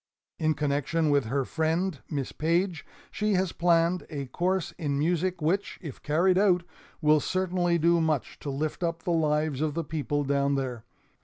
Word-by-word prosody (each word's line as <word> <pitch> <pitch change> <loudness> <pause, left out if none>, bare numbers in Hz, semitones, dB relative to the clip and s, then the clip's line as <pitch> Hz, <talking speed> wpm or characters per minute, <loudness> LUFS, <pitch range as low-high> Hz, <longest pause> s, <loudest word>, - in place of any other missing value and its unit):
In 155 -1 +2
connection 150 +2 0
with 140 -4 +3
her 135 +4 -1
friend 160 +1 -1
Miss 140 -4 -3
Page 170 +1 0 0.3
she 210 0 0
has 185 -2 +1
planned 170 +1 +2
a 145 -3 -4
course 180 +7 -1
in 145 -4 -1
music 175 +3 0
which, 190 +6 0
if 150 -8 -9
carried 180 +5 +3
out, 180 -4 +3 0.4
will 155 -1 +5
certainly 180 0 0
do 170 +1 +3
much 155 -4 -1
to 145 - -5
lift 150 +5 -3
up 170 -1 -2
the 175 - -1
lives 150 -3 +1
of 155 -1 -1
the 165 - -1
people 145 -1 -2
down 140 0 +1
there. 125 -4 -3
160 Hz, 170 wpm, -27 LUFS, 145-175 Hz, 0.4 s, will